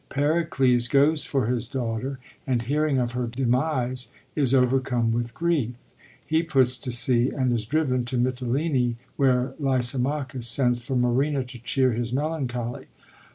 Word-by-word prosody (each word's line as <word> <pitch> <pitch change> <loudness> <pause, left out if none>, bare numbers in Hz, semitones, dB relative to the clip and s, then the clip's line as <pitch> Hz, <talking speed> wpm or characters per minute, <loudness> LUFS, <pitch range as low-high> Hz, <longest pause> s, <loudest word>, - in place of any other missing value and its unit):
Pericles 135 -5 +1
goes 145 +4 +3
for 135 -4 0
his 120 0 -1
daughter, 125 +2 -3 0.3
and, 125 -3 0
hearing 145 +2 0
of 120 -2 0
her 125 0 -2
demise, 125 +1 -1 0.3
is 140 -5 +1
overcome 125 -2 +2
with 120 0 -3
grief. 155 -8 0 0.5
He 160 +1 +1
puts 135 -7 +3
to 130 - -3
sea, 120 +1 +4
and 130 -3 0
is 110 -3 -2
driven 130 -3 0
to 125 +1 -3
Mitylene, 125 +1 0 0.2
where 130 -1 +1
Lysimachus 130 -1 0
sends 125 0 +2
for 130 +2 -3
Marina 130 +3 +1
to 125 -2 -11
cheer 130 +1 +1
his 120 0 -2
melancholy. 130 -4 -3
130 Hz, 145 wpm, -25 LUFS, 120-140 Hz, 0.5 s, sea